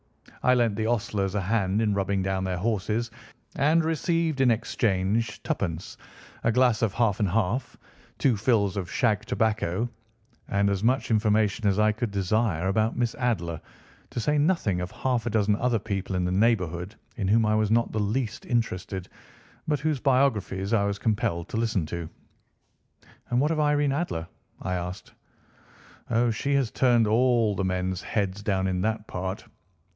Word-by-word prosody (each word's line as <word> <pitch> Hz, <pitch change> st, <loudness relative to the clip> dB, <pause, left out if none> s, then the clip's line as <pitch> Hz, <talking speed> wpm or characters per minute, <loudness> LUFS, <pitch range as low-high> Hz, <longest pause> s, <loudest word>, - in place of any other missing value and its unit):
I 125 Hz, -, +4 dB
lent 115 Hz, -4 st, +2 dB
the 110 Hz, +1 st, -1 dB
ostlers 105 Hz, -4 st, -1 dB
a 105 Hz, -, +1 dB
hand 100 Hz, 0 st, 0 dB
in 105 Hz, -2 st, +2 dB
rubbing 100 Hz, -1 st, 0 dB
down 95 Hz, 0 st, -1 dB
their 95 Hz, -1 st, -2 dB
horses, 110 Hz, +3 st, -1 dB, 0.4 s
and 155 Hz, +4 st, +3 dB
received 165 Hz, -2 st, 0 dB
in 130 Hz, -, +5 dB
exchange 105 Hz, -1 st, 0 dB
twopence, 85 Hz, -2 st, -3 dB, 0.5 s
a 115 Hz, -, +3 dB
glass 125 Hz, -2 st, +3 dB
of 110 Hz, -4 st, 0 dB
half 115 Hz, -5 st, +1 dB
and 105 Hz, -3 st, +1 dB
half, 110 Hz, +6 st, -1 dB, 0.4 s
two 130 Hz, -4 st, +2 dB
fills 105 Hz, -3 st, +1 dB
of 90 Hz, -3 st, -3 dB
shag 110 Hz, -5 st, +1 dB
tobacco, 110 Hz, -1 st, 0 dB, 0.6 s
and 100 Hz, 0 st, +2 dB
as 100 Hz, 0 st, -2 dB
much 125 Hz, +2 st, +1 dB
information 105 Hz, 0 st, +2 dB
as 100 Hz, -1 st, +2 dB
I 105 Hz, 0 st, +4 dB
could 115 Hz, +2 st, -3 dB
desire 100 Hz, -2 st, 0 dB
about 110 Hz, +4 st, +1 dB
Miss 120 Hz, -1 st, 0 dB
Adler, 95 Hz, -, -2 dB, 0.5 s
to -, -, -4 dB
say 150 Hz, +6 st, +1 dB
nothing 145 Hz, -, +1 dB
of 90 Hz, -, -4 dB
half 120 Hz, 0 st, -1 dB
a -, -, +1 dB
dozen 105 Hz, -1 st, +2 dB
other 125 Hz, 0 st, +1 dB
people 100 Hz, -3 st, -3 dB
in 90 Hz, -1 st, 0 dB
the 90 Hz, -, 0 dB
neighbourhood 95 Hz, -2 st, +1 dB, 0.2 s
in 95 Hz, -, -1 dB
whom 110 Hz, +3 st, +4 dB
I 105 Hz, -, +2 dB
was 110 Hz, -1 st, +2 dB
not 115 Hz, +1 st, +3 dB
in -, -, -12 dB
the 110 Hz, -, -2 dB
least 110 Hz, +3 st, -2 dB
interested, 95 Hz, -6 st, -2 dB, 0.6 s
but 150 Hz, -2 st, +1 dB
whose 155 Hz, -2 st, 0 dB
biographies 115 Hz, -7 st, +1 dB
I 100 Hz, -3 st, +3 dB
was 100 Hz, 0 st, -1 dB
compelled 100 Hz, -6 st, -1 dB
to -, -, -3 dB
listen 110 Hz, -7 st, 0 dB
to." 85 Hz, -1 st, -5 dB, 1.2 s
"And 125 Hz, -, +2 dB
what 150 Hz, +4 st, +2 dB
of 160 Hz, -, 0 dB
Irene 145 Hz, -1 st, +2 dB
Adler?" 135 Hz, -, -2 dB, 0.3 s
I 90 Hz, -, -3 dB
asked. 90 Hz, 0 st, -5 dB, 1.0 s
"Oh, 120 Hz, +1 st, +2 dB
she 140 Hz, +5 st, -1 dB
has 135 Hz, -5 st, +1 dB
turned 120 Hz, -3 st, +3 dB
all 115 Hz, -1 st, +3 dB
the 95 Hz, -, -1 dB
men's 95 Hz, 0 st, -1 dB
heads 100 Hz, -1 st, -2 dB
down 95 Hz, -2 st, 0 dB
in 90 Hz, -1 st, 0 dB
that 110 Hz, +1 st, -1 dB
part. 95 Hz, +1 st, -5 dB
110 Hz, 175 wpm, -26 LUFS, 95-120 Hz, 1.2 s, in